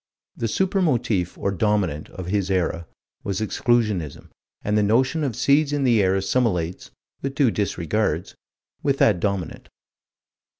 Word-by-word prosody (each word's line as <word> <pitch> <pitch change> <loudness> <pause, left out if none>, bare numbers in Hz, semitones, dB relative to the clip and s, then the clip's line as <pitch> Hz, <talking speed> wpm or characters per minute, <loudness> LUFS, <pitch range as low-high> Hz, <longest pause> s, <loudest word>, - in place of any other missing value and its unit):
The 115 - -2
super 190 - 0
motif, 120 - 0
or 100 - -1
dominant, 95 -6 0
of 95 - -8
his 95 +1 -1
era, 85 -3 -1 0.4
was 100 -1 -2
Exclusionism, 110 - 0 0.3
and 105 - 0
the 105 - +4
notion 130 +9 +2
of 130 -6 -2
seeds 140 +4 +3
in 145 -1 0
the 120 -5 +4
air 95 0 +2
assimilates 95 -4 -1 0.3
with 135 0 -4
due 135 -5 +3
disregards 95 -3 -1 0.5
with 140 -1 +1
that 105 -9 +4
dominant. 100 -3 -3
105 Hz, 140 wpm, -23 LUFS, 95-125 Hz, 0.5 s, the